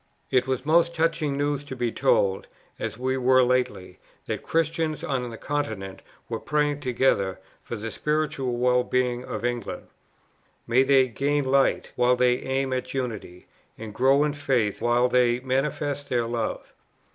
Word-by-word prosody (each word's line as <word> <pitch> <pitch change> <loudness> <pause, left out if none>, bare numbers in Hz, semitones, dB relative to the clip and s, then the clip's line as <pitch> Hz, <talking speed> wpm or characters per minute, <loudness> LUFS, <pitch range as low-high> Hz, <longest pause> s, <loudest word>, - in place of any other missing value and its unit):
It 130 -1 +2
was 130 0 -2
most 170 +2 +3
touching 160 -3 0
news 145 0 -1
to 130 - -7
be 120 -2 -1
told, 95 -3 +1 0.3
as - - -4
we 130 +1 -1
were 130 0 +4
lately, 125 -7 -1 0.3
that - - -3
Christians 160 -1 -1
on 125 -3 -2
the 115 - -8
Continent 140 -11 -4 0.3
were - - -4
praying 150 -1 0
together 120 -8 +1 0.2
for - - -6
the 110 +1 -5
spiritual 150 -5 -1
well 125 0 +3
being 125 -1 0
of 120 - -5
England. 120 -3 -4 0.8
May 120 +3 +3
they 135 -1 +4
gain 140 +5 0
light, 135 +1 +2
while 125 +1 +3
they 125 0 +3
aim 130 0 -2
at 130 +1 -4
unity, 110 -8 -5 0.3
and 110 -1 -8
grow 135 +4 +4
in 150 -1 0
faith 130 -8 0
while 120 +1 +3
they 125 -1 +3
manifest 140 +2 -2
their 120 -2 +1
love! 115 -1 -4
130 Hz, 160 wpm, -25 LUFS, 120-145 Hz, 0.8 s, were